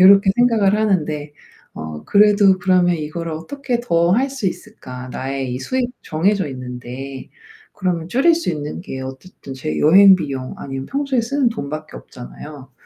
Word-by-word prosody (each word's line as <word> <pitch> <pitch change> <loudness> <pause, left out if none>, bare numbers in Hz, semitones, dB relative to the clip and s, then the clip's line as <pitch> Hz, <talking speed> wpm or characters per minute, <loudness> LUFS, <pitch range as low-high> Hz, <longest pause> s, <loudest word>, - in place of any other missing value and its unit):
요렇게 195 +1 +7
생각을 225 -5 +3
하는데 155 -8 -1 0.4
어 80 -1 -7
그래도 205 -2 +5
'그러면 180 -1 +3
이거를 165 +2 -5
어떻게 245 - -3
더 170 -7 +2
할 260 +7 +2
수 265 -7 -3
있을까, 130 - -7
나의 135 0 -4
이 - - -3
수입이 250 - -2
정해져 190 +2 0
있는데.' 125 +1 -7 0.4
그러면 180 -4 -2
줄일 275 - +4
수 335 - -2
있는 150 -1 -5
게 135 -8 -6
어쨌든 135 +2 -9
제 155 +4 -4
여행 190 +5 +8
비용 135 -6 -5
아니면 135 -1 -6
평소에 275 -2 0
쓰는 270 +2 +1
돈 140 -11 -5
밖에 155 0 -7
없잖아요. 135 +2 -11
170 Hz, 335 characters per minute, -19 LUFS, 135-210 Hz, 0.4 s, 여행